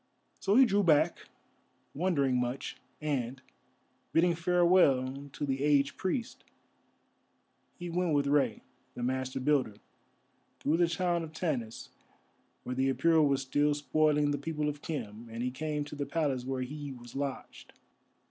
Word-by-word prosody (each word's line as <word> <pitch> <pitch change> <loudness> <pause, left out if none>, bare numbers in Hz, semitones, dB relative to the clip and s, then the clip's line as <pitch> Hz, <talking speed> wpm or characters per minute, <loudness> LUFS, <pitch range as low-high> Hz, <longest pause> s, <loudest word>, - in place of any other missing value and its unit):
So 200 +1 +1
he 265 +2 +8
drew 205 -3 +2
back, 160 -6 +2 0.7
wondering 145 -6 +1
much; 125 +2 -3 0.3
and, 135 -4 -2 0.7
bidding 170 +1 +4
farewell 165 -6 +3
to 145 - -4
the 135 -1 -2
aged 145 -1 +3
priest, 230 +6 -3 1.3
he 175 - -6
went 175 -2 0
with 140 -1 +2
Rei, 140 -6 +1 0.3
the 120 - -5
Master 130 +1 -2
Builder, 130 -6 +1 0.8
through 155 +3 +1
the 175 0 +4
town 175 0 0
of 160 -1 -7
Tanis, 130 -10 -3 0.7
where 125 - -4
the 130 +1 +1
Apura 160 +5 +4
were 140 -2 +3
still 145 +2 +1
spoiling 150 0 +2
the 145 - -1
people 150 0 -2
of 145 0 -6
Khem, 115 -7 -6
and 115 +1 -5
he 125 - -1
came 150 +2 -3
to 145 - -8
the 145 -1 -3
Palace 140 -5 -1
where 130 -1 -2
he 145 +2 -6
was 120 -1 -11
lodged. 140 -1 -5
145 Hz, 150 wpm, -31 LUFS, 130-160 Hz, 1.3 s, he